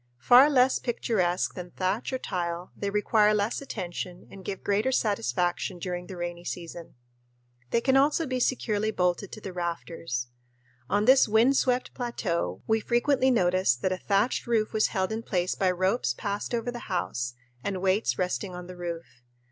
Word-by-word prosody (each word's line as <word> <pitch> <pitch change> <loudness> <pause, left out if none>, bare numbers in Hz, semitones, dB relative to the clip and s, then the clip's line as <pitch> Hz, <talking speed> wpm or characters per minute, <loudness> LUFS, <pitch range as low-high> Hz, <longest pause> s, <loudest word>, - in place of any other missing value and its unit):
Far 245 - +7
less 260 -2 +4
picturesque 190 -7 0
than 180 -1 -7
thatch 190 +8 -2
or 260 - -1
tile, 175 -5 -4
they 200 - -3
require 210 +1 +3
less 210 +5 0
attention 180 -7 -6
and 195 - -11
give 195 0 -5
greater 210 +6 +1
satisfaction 180 - 0
during 180 0 -4
the 190 - -8
rainy 175 0 -5
season. 170 -1 -7 0.7
They 235 - +2
can 265 +2 +2
also 290 +4 +3
be 255 -2 -2
securely 220 -4 0
bolted 180 -1 0
to 215 - -9
the 190 - -7
rafters. 165 -7 -4 0.6
On 205 +1 +2
this 260 +2 +6
wind 225 +6 +4
swept 250 -1 +1
plateau 170 - -2
we 220 0 +2
frequently 255 +4 +2
noticed 185 - +2
that 185 - +2
a 185 - -1
thatched 205 +5 +1
roof 225 -2 +1
was 215 - +3
held 190 -1 -1
in 220 +1 -2
place 180 -4 -1
by 190 - +1
ropes 185 - +1
passed 205 - -3
over 235 +1 -2
the 240 -1 -8
house 125 -9 -2 0.3
and 195 -2 -2
weights 185 - +1
resting 180 +1 -2
on 180 0 -7
the 180 0 -9
roof. 170 -7 -7
195 Hz, 170 wpm, -27 LUFS, 175-230 Hz, 0.7 s, Far